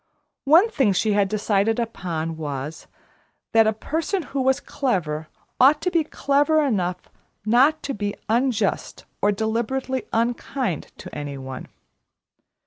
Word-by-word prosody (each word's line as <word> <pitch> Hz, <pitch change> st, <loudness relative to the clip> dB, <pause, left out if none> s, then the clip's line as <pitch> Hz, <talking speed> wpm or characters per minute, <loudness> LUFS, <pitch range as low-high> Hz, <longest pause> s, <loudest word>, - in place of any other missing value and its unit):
One 330 Hz, +9 st, +6 dB
thing 265 Hz, -, +2 dB
she 210 Hz, +3 st, +1 dB
had 200 Hz, -1 st, +3 dB
decided 215 Hz, +1 st, +1 dB
upon 170 Hz, -8 st, -3 dB
was, 150 Hz, -1 st, -5 dB, 0.6 s
that 225 Hz, -1 st, +5 dB
a -, -, +4 dB
person 320 Hz, -, -2 dB
who 280 Hz, -2 st, -3 dB
was 265 Hz, +1 st, +2 dB
clever 165 Hz, -, -2 dB, 0.3 s
ought 280 Hz, +4 st, +6 dB
to 360 Hz, -, 0 dB
be 335 Hz, -2 st, +2 dB
clever 290 Hz, +1 st, +2 dB
enough 180 Hz, -8 st, -2 dB, 0.3 s
not 265 Hz, +8 st, +4 dB
to 275 Hz, -, -3 dB
be 205 Hz, -1 st, -3 dB
unjust 230 Hz, -3 st, 0 dB, 0.2 s
or 205 Hz, -, +4 dB
deliberately 235 Hz, +5 st, -2 dB
unkind 235 Hz, -, -1 dB
to -, -, -10 dB
any 145 Hz, -1 st, -5 dB
one. 130 Hz, -1 st, -7 dB
225 Hz, 135 wpm, -23 LUFS, 185-275 Hz, 0.6 s, One